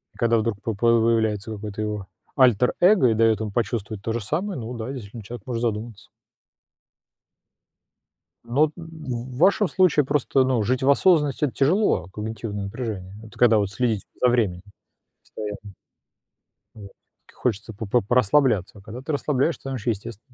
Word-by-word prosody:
Когда 115 -1 +2
вдруг 110 -2 -2
по 115 - -2
появляется 110 -1 +2
какое-то 105 0 -6
его 105 -2 -4 0.3
альтер-эго 130 - +4
и - - +3
дает 110 -1 +3
ему 110 -2 -4
почувствовать 110 -2 -2
то 115 - -2
же 120 - -2
самое, 170 - -3
ну 115 +1 -6
да, 115 +3 -5
действительно 115 -4 -8
человек 115 0 -9
может 120 -2 -3
задуматься. 115 -1 -4 2.4
Ну, 140 +6 +2
в 130 -8 -7
вашем 195 +6 +4
случае 170 -6 +3
просто, 135 -1 +2
ну, 130 -3 +1
жить 125 +4 0
в 135 - +3
осознанности- 150 -2 +3
это 135 - -4
тяжело, 175 - +2
а - - -15
когнитивное 105 -1 -5
напряжение- 100 -3 -5
это 110 - -14
когда 115 -3 +5
вот 100 -2 0
следить 110 0 -1 0.2
за 125 - +5
временем 105 -8 +1 0.6
постоянно. 105 -1 -8 1.0
Вот. 100 -3 -11 0.4
Хочется 110 -2 -3
п 110 +2 -6
п 120 +4 +2
порасслабляться, 110 -3 +2
а - - -16
когда 110 +5 -9
ты 145 - -4
расслабляешься, 145 +2 0
там 135 0 -4
еще 120 -1 -1
естест 105 -2 -7
115 Hz, 155 wpm, -24 LUFS, 105-130 Hz, 2.4 s, когда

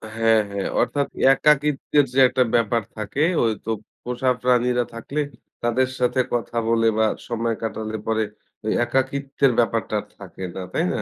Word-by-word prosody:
হ্যাঁ, 115 0 +4
হ্যাঁ। 100 -1 -2
অর্থাৎ 140 -1 0 0.3
একাকিত্বের 145 0 +2
যে 135 - +2
একটা 130 0 +2
ব্যাপার 115 0 +2 0.2
থাকে, 105 +7 -1 0.2
ঐ - - +3 0.2
তো 115 - -1 0.3
পোষা 125 +1 0
প্রাণীরা 125 0 +2
থাকলে 140 +6 -3 0.4
তাদের 130 +2 +2
সাথে 125 +1 +1
কথা 120 -1 -2
বলে 115 0 +3
বা 110 - +4 0.2
সময় 115 -1 -1
কাটালে 110 0 -3
পরে 110 0 +1 0.4
ওই 110 - 0
একাকিত্বের 135 +1 +1
ব্যাপারটা 115 -2 0
আর - - -16
থাকে 95 -1 -10
না। 95 - -4
তাই - - +1
না? - - -2
120 Hz, 160 wpm, -23 LUFS, 110-130 Hz, 0.4 s, হ্যাঁ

